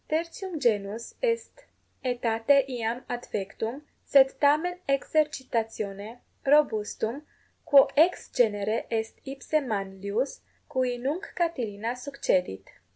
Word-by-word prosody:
Tertium 335 +2 -3
genus 220 -2 0
est 485 +1 -2 0.4
aetate 245 +2 +2
iam 240 -1 -3
adfectum, 235 +2 -4 0.2
sed 270 -1 +5
tamen 310 +5 +3
exercitatione 235 -7 -1 0.2
20 - - -13
robustum, 240 -3 +2 0.4
quo 280 -4 +7
ex 335 +5 +3
genere 215 -2 +1
est 225 -1 -2
ipse 270 +3 -9
Manlius, 200 +2 -3 0.3
cui 255 -1 0
nunc 295 +11 -3
Catilina 240 - -2
succedit. 250 - -1
245 Hz, 95 wpm, -27 LUFS, 220-290 Hz, 0.4 s, quo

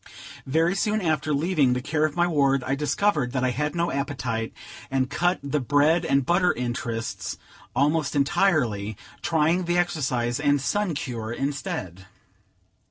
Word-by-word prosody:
Very 165 +6 +2
soon 210 +2 0
after 155 -5 0
leaving 145 -3 +2
the 125 - 0
care 155 +2 +1
of 155 - -2
my 175 0 +3
ward, 140 -5 +2
I 130 - -1
discovered 150 -2 0
that 130 -2 0
I 130 - +2
had 150 +4 -2
no 170 0 0
appetite, 130 -5 -2 0.4
and 130 0 0
cut 175 +1 +1
the 140 +1 -1
bread 145 +6 +3
and 140 -1 +2
butter 175 +3 +3
interests 120 -2 -4 0.4
almost 150 +1 +1
entirely, 130 - +1 0.2
trying 165 +3 +2
the 175 +1 +1
exercise 130 -8 0
and 145 -1 +2
sun 185 +5 -1
cure 115 -5 -4
instead. 95 -9 -4
145 Hz, 150 wpm, -25 LUFS, 125-165 Hz, 0.4 s, my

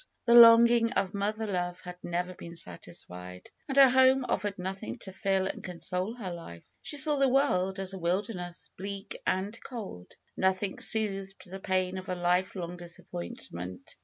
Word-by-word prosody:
The 235 - +4
longing 235 0 +8
of 190 -5 0
mother 210 +2 -1
love 180 -3 -2
had 180 0 -10
never 175 +1 -2
been 170 -1 -10
satisfied, 90 - -7 0.2
and 270 - -3
her 275 -1 +9
home 260 +1 +4
offered 200 0 -1
nothing 190 +5 -5
to 190 - -6
fill 190 +1 0
and 190 - -5
console 180 +4 -2
her 195 -7 -5
life. 85 - -10 0.2
She 295 - -3
saw 295 0 +3
the 275 -1 +4
world 195 -9 +2
as 195 0 -1
a 190 - -6
wilderness, 180 0 -3
bleak 200 +1 -6
and 195 +4 -1
cold. 205 - -8 0.2
Nothing 190 +1 0
soothed 195 -3 +2
the 190 +2 -8
pain 185 -1 -1
of 185 - -10
a 185 - -1
lifelong 180 0 -1
disappointment. 90 - -8
190 Hz, 160 wpm, -29 LUFS, 175-215 Hz, 0.2 s, her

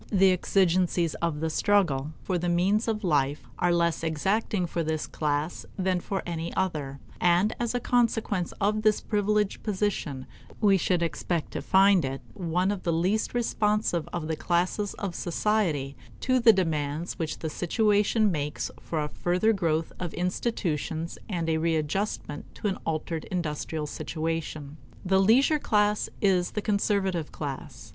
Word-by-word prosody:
The 195 -2 +5
exigencies 180 -2 +2
of 165 -3 -1
the 160 0 0
struggle 155 -9 +2
for 185 -2 -1
the 175 +1 -1
means 190 +6 +2
of 220 -1 -1
life 145 -4 +1 0.2
are 175 - +3
less 170 -1 +1
exacting 185 +5 0
for 170 0 -2
this 155 -1 -1
class 150 +2 -2
than 185 -1 +1
for 195 +2 -3
any 170 -1 -3
other; 150 -7 -2 0.2
and 180 +5 +3
as 240 0 -1
a - - +2
consequence 225 -7 +1
of 210 +1 +1
this 215 -1 +3
privileged 210 -1 0
position 190 - -2 0.3
we 205 -3 +5
should 180 -1 +1
expect 170 0 -2
to - - -4
find 195 -2 +5
it 135 0 -3
one 180 0 0
of 200 -2 -3
the 170 - 0
least 185 +9 0
responsive 210 -7 0
of 160 -3 -3
the 160 - -1
classes 180 +5 0
of 200 -4 -4
society 170 -7 0 0.3
to 255 0 +2
the 230 -1 +8
demands 160 -3 -1
which 160 -2 -2
the 160 - -4
situation 210 +4 +2
makes 150 -2 -3
for 160 -2 -2
a - - -2
further 180 +8 +1
growth 165 -5 0
of 175 -3 -4
institutions 170 - -2
and 170 -5 -2
a 160 -1 +2
readjustment 160 0 -1
to - - -2
an 195 - -2
altered 160 0 -2
industrial 155 -3 -3
situation. 155 -1 -4 0.3
The 190 +1 +3
leisure 265 +9 +4
class 210 -4 +1
is 185 -3 +2
the 210 - -1
conservative 200 -5 0
class. 130 -5 -6
175 Hz, 155 wpm, -27 LUFS, 160-205 Hz, 0.3 s, the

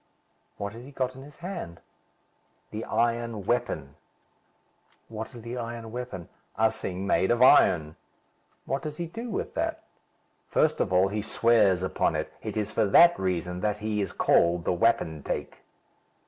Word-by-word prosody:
"What 100 0 -4
has 115 +2 -10
he 135 - -11
got 130 -2 -3
in 130 - -10
his 145 +1 -14
hand?" 170 - -6 0.9
"The 110 +1 -4
iron 115 -2 -1
weapon." 70 - -2 1.1
"What 110 +3 -7
is 115 - -10
the 120 +2 -5
iron 115 -1 -6
weapon?" 120 -8 -6 0.3
"A 110 0 +3
thing 95 -4 -5
made 95 -1 +2
of 120 +1 +4
iron." 80 -10 +5 0.7
"What 135 - -2
does 150 -1 -6
he 175 - -3
do 230 +9 -7
with 215 - -3
that?" - - -2 0.6
"First - - +2
of - - -1
all, 95 +1 +4
he 105 +1 -2
swears 105 -4 +3
upon 95 - 0
it. - - -3
It - - -5
is 105 0 -1
for 110 - +2
that 170 - +6
reason 90 -1 -2
that 105 +1 0
he 105 0 -2
is 100 - -2
called 85 0 +2
the - - +2
wapentake." 80 -7 -1
110 Hz, 160 wpm, -27 LUFS, 95-120 Hz, 1.1 s, that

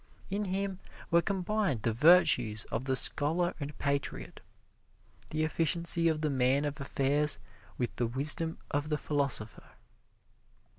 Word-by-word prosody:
In 205 +1 -1
him 190 0 -2 0.3
were 170 0 +5
combined 190 - -1
the 115 - +1
virtues 125 -6 +4
of 125 - -2
the 130 -1 +1
scholar 165 +7 +2
and 145 0 -6
patriot, 140 - -3 0.9
the 155 0 -1
efficiency 170 +1 +1
of 155 -2 0
the 155 - 0
man 135 +2 +2
of 145 0 -4
affairs 140 +2 +1 0.4
with 120 - -2
the 120 - 0
wisdom 155 +7 -1
of 145 +1 -1
the 150 - 0
philosopher. 140 -8 -2
150 Hz, 135 wpm, -30 LUFS, 135-170 Hz, 0.9 s, were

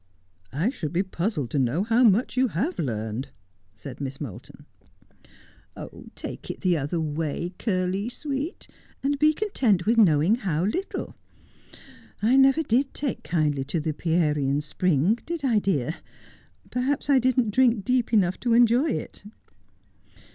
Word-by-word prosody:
' 90 -1 -41
I 165 - 0
should 165 - -5
be 175 +3 +1
puzzled 170 - -3
to 145 - 0
know 135 +8 +1
how 230 +3 +3
much 225 +2 +3
you 260 0 +3
have 245 - -2
learned,' 110 -1 -3 0.5
said 130 +4 -9
Miss 135 -1 -5
Moulton. 125 -11 -9 0.8
' - - -13
Take - - -8
it - - -6
the 180 -2 +2
other 150 +3 -2
way, 160 +3 -3
Curly 190 0 -1
sweet, 285 +5 -5 0.4
and 280 +1 0
be 305 +1 +5
content 265 - 0
with 230 +2 +3
knowing 175 +1 +4
how 180 -6 -1
little. 360 - -3 1.0
I 230 +5 +3
never 270 +3 +5
did 270 +1 0
take 280 -3 -3
kindly 150 -4 0
to 155 +4 -1
the 155 0 -2
Pierian 150 -4 +1
spring, 180 - +1
did 335 -4 -4
I, 230 -5 +3
dear? 160 -6 -1 0.7
Perhaps 260 +3 -1
I 280 -2 +5
didn't 250 -3 +1
drink 235 -3 +3
deep 250 -3 +1
enough 185 -5 +2
to 235 -2 +1
enjoy 240 +5 +4
it. - - -5
195 Hz, 150 wpm, -25 LUFS, 150-250 Hz, 1.0 s, be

